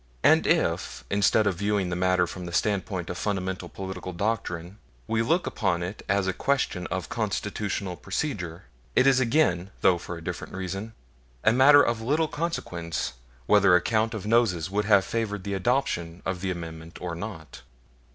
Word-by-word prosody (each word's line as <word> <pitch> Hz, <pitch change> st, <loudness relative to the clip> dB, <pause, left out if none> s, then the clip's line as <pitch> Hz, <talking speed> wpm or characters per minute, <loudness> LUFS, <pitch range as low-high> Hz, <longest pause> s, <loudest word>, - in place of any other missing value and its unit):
And -, -, +5 dB
if, -, -, 0 dB
instead 100 Hz, +2 st, +3 dB
of 95 Hz, -4 st, +1 dB
viewing 100 Hz, -1 st, 0 dB
the -, -, -1 dB
matter 90 Hz, 0 st, +2 dB
from 90 Hz, +1 st, -7 dB
the -, -, -6 dB
standpoint 95 Hz, -2 st, -1 dB
of 90 Hz, -, -6 dB
fundamental 95 Hz, -2 st, -2 dB
political 95 Hz, -1 st, -6 dB
doctrine, 95 Hz, -2 st, -3 dB, 0.3 s
we 115 Hz, 0 st, 0 dB
look 165 Hz, +10 st, +1 dB
upon 90 Hz, -5 st, 0 dB
it 90 Hz, +4 st, -6 dB
as 100 Hz, 0 st, +2 dB
a 95 Hz, -, 0 dB
question 115 Hz, -10 st, 0 dB
of -, -, -3 dB
Constitutional 100 Hz, -3 st, -2 dB
procedure, 90 Hz, -, -4 dB, 0.3 s
it 130 Hz, -, +5 dB
is 135 Hz, -2 st, +5 dB
again 115 Hz, -, +2 dB
though 90 Hz, -2 st, +4 dB
for 85 Hz, 0 st, -6 dB
a 85 Hz, -, -10 dB
different -, -, -5 dB
reason 95 Hz, +4 st, -4 dB, 0.5 s
a 110 Hz, -, +5 dB
matter 140 Hz, +3 st, +7 dB
of 115 Hz, -1 st, 0 dB
little 150 Hz, +7 st, +1 dB
consequence 90 Hz, -, -3 dB, 0.3 s
whether 100 Hz, +2 st, +5 dB
a 90 Hz, -, +4 dB
count 110 Hz, +3 st, +1 dB
of 105 Hz, -, -5 dB
noses 105 Hz, -6 st, +2 dB
would 105 Hz, +1 st, 0 dB
have 100 Hz, -2 st, +5 dB
favored 105 Hz, -2 st, -2 dB
the 100 Hz, -, -3 dB
adoption 95 Hz, -6 st, -1 dB
of 95 Hz, -1 st, -2 dB
the 95 Hz, -, -1 dB
Amendment 80 Hz, -2 st, -6 dB
or 90 Hz, -2 st, -4 dB
not. 85 Hz, -3 st, -7 dB
95 Hz, 170 wpm, -26 LUFS, 90-110 Hz, 0.5 s, matter